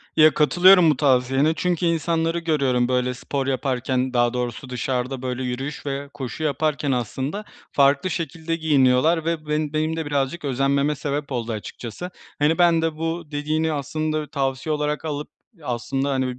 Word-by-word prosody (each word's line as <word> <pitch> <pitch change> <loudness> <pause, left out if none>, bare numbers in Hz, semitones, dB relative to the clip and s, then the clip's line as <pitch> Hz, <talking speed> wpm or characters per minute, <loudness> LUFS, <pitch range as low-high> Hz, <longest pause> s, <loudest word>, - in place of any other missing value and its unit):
Ya, 155 -1 +6
katılıyorum 175 +3 +6
bu 150 - +2
tavsiyene, 135 +2 +3
çünkü 175 0 0
insanları 165 0 +1
görüyorum, 135 -7 +1
böyle, 125 0 0
spor 135 +2 -3
yaparken, 130 -1 -1
daha 120 -1 +2
doğrusu 125 +1 -4
dışarıda, 125 +1 -2
böyle, 130 0 -3
yürüyüş 130 +5 -4
ve 140 0 -4
koşu 135 +3 -5
yaparken 150 -1 0
aslında. 130 - -2 0.3
Farklı 140 +4 +3
şekilde 165 -1 -3
giyiniyorlar 155 +1 +3
ve 165 -2 -2
bu - - -12
ben 150 0 -1
benim 155 +1 0
de 160 -1 -3
birazcık 145 +2 -1
özenmeme 140 +2 +1
sebep 145 0 -3
oldu 120 -2 -2
açıkçası. 115 - -6 0.3
Hani, 150 +3 +3
ben 170 -2 +4
de, 165 -1 -1
bu 165 0 -3
dediğini 155 +2 0
aslında 155 +2 -2
tavsiye 135 +1 -1
olarak 150 +1 -2
alıp, 150 -1 -4 0.3
aslında, 135 +2 -2
hani, 130 -2 -1
145 Hz, 155 wpm, -23 LUFS, 130-160 Hz, 0.3 s, Ya